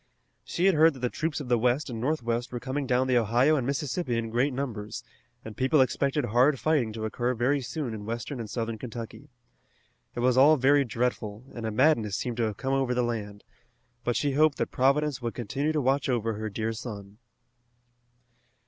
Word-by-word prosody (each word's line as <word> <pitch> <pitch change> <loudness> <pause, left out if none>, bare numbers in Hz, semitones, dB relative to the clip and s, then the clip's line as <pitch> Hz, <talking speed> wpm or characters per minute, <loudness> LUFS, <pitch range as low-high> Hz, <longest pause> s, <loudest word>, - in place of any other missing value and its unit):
She 175 - -1
had 195 - +5
heard 160 0 +5
that 130 - -11
the 125 - -1
troops 155 -1 -2
of 145 - -6
the 120 -1 +2
west 125 +5 +1
and 115 -4 -5
northwest 120 -3 -1
were 120 - -4
coming 135 +2 -3
down 125 0 +2
the 125 -2 +3
Ohio 120 +7 +3
and 130 -4 -1
Mississippi 140 -2 -1
in 115 -1 -3
great 125 +5 +1
numbers, 120 -6 -5 0.4
and 110 -1 -8
people 135 +3 +2
expected 140 +1 +1
hard 125 +5 +3
fighting 145 -8 +1
to 110 0 -4
occur 120 +3 -1
very 135 +5 +1
soon 125 0 -4
in 105 -1 -7
western 120 +4 -4
and 110 -2 -6
southern 115 0 -3
Kentucky. 120 +4 -8 0.9
It 120 - -2
was 125 0 +3
all 150 +4 +7
very 140 +2 +4
dreadful, 115 -1 -2
and 115 -2 -4
a - - -2
madness 115 -4 +2
seemed 120 +1 -3
to 120 - +1
have 110 -2 -3
come 135 0 -2
over 135 -2 +1
the 125 - +2
land, 105 -4 -4 0.6
but 120 0 0
she 145 - +1
hoped 150 +1 +3
that - - -2
Providence 140 +1 +1
would 115 -1 -4
continue 135 +6 -2
to 155 - 0
watch 135 +1 +1
over 115 -3 0
her 110 +1 -4
dear 110 +2 -2
son. 105 -3 -8
125 Hz, 200 wpm, -27 LUFS, 115-140 Hz, 0.9 s, all